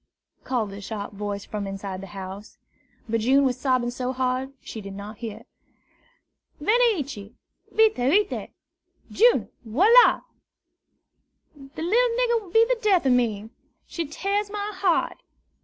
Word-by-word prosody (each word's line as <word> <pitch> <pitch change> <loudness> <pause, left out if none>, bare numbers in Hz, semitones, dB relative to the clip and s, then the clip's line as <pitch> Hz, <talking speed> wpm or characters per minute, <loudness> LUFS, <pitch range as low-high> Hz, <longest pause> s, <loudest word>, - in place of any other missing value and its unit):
called 225 -6 -2
a 200 - -8
sharp 205 0 -6
voice 205 0 -5
from 210 -1 -5
the 195 -1 -6
house. 190 +2 -9 0.5
But 230 0 0
June 270 +5 +4
was 255 -2 +1
sobbing 255 -3 +1
so 250 +1 -3
hard 255 +1 -1
she 220 - -8
did 195 -1 -8
not 205 +2 -9
hear. 225 -3 -7 1.2
"Venez 440 +2 +3
ici, 215 -7 -8 0.4
vite, 445 -1 +4
vite! 345 +12 +1 0.6
June! 475 +2 +4
Voila! 390 - +5 1.3
The 280 +1 -9
little 465 +6 +2
nigger 475 -2 +2
will 380 -4 -14
be 450 +4 +5
the - - 0
death 385 -7 +3
of 265 - +4
me. 225 -3 0 0.3
She 335 -3 -4
tears 400 +6 -2
my 415 0 -4
heart. 375 -3 0
260 Hz, 140 wpm, -25 LUFS, -, 1.3 s, Voila